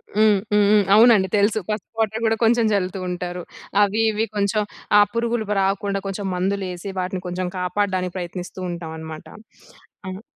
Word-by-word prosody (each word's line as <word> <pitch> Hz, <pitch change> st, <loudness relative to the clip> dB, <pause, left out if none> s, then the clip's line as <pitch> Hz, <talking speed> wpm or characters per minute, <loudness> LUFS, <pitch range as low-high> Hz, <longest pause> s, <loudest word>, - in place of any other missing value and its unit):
హ్మ్. 210 Hz, -2 st, +4 dB
హ్మ్. 210 Hz, 0 st, +5 dB
హ్మ్. 210 Hz, -1 st, +5 dB
అవునండి 220 Hz, -3 st, +6 dB
తెలుసు. 205 Hz, +2 st, +2 dB
పసుపు 210 Hz, 0 st, -4 dB
వాటర్ 220 Hz, 0 st, 0 dB
కూడా 225 Hz, 0 st, +3 dB
కొంచెం 230 Hz, 0 st, +4 dB
చల్లుతూ 190 Hz, -1 st, -1 dB
ఉంటారు. 180 Hz, 0 st, -4 dB, 0.4 s
అవి 210 Hz, +2 st, +1 dB
ఇవి 215 Hz, +1 st, 0 dB
కొంచెం 205 Hz, +1 st, +1 dB, 0.4 s
ఆ! -, -, +8 dB
పురుగులు 235 Hz, -1 st, -1 dB
ప -, -, -1 dB
రాకుండా 195 Hz, +1 st, 0 dB
కొంచెం 195 Hz, 0 st, -4 dB
మందులు 195 Hz, +2 st, -1 dB
వేసి 180 Hz, +2 st, -6 dB
వాటిని 185 Hz, 0 st, -3 dB
కొంచెం 180 Hz, 0 st, -3 dB
కాపాడడానికి 185 Hz, 0 st, -1 dB
ప్రయత్నిస్తూ 180 Hz, +1 st, -6 dB
ఉంటాం 170 Hz, -2 st, -6 dB
అన్నమాట. 160 Hz, -1 st, -8 dB, 0.8 s
ఆహ్! 185 Hz, +1 st, -6 dB
195 Hz, 160 wpm, -22 LUFS, 180-215 Hz, 0.8 s, ఆ